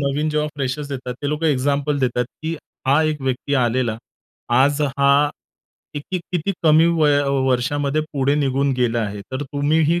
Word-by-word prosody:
नवीन 145 Hz, +2 st, 0 dB
जेव्हा 150 Hz, 0 st, 0 dB
फ्रेशर्स 140 Hz, +2 st, -3 dB
देतात 130 Hz, -3 st, -5 dB
ते 145 Hz, -, -1 dB
लोकं 150 Hz, +2 st, -1 dB
एक्झाम्पल 145 Hz, +1 st, +1 dB
देतात 125 Hz, -2 st, 0 dB, 0.2 s
की 160 Hz, +1 st, -2 dB, 0.3 s
"हा 140 Hz, +4 st, +4 dB
एक 155 Hz, -1 st, -1 dB
व्यक्ती 135 Hz, +2 st, -1 dB
आलेला. 120 Hz, -3 st, +1 dB, 0.5 s
आज 135 Hz, +5 st, +3 dB
हा 140 Hz, +1 st, +3 dB, 0.7 s
किती-किती 175 Hz, +4 st, -3 dB
कमी 160 Hz, 0 st, +5 dB
वय 155 Hz, -4 st, +3 dB, 0.3 s
वर्षामध्ये 140 Hz, +3 st, 0 dB
पुढे 140 Hz, -1 st, +1 dB
निघून 140 Hz, -1 st, +1 dB
गेला 120 Hz, -2 st, +1 dB
आहे. 105 Hz, -2 st, -4 dB
तर 130 Hz, +2 st, -2 dB
तुम्हीही 150 Hz, +4 st, +1 dB
145 Hz, 150 wpm, -21 LUFS, 130-150 Hz, 0.7 s, कमी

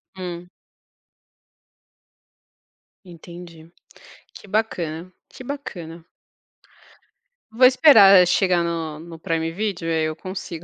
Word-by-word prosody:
Hum. 180 Hz, -1 st, -8 dB, 2.5 s
Entendi. 170 Hz, -2 st, -14 dB, 0.6 s
Que -, -, -14 dB
bacana 185 Hz, -5 st, -3 dB, 0.2 s
que -, -, -13 dB
bacana. 175 Hz, -, -9 dB, 1.5 s
Vou 255 Hz, +3 st, +4 dB
esperar 215 Hz, -, +6 dB
chegar 180 Hz, -1 st, +1 dB
no 165 Hz, -2 st, -4 dB
no 165 Hz, +1 st, -12 dB
Prime 165 Hz, 0 st, -3 dB
Video 190 Hz, -1 st, -4 dB
e -, -, -1 dB
aí 160 Hz, -1 st, 0 dB
eu 155 Hz, 0 st, -4 dB
consigo 175 Hz, -1 st, -8 dB
175 Hz, 95 wpm, -21 LUFS, 165-195 Hz, 2.5 s, esperar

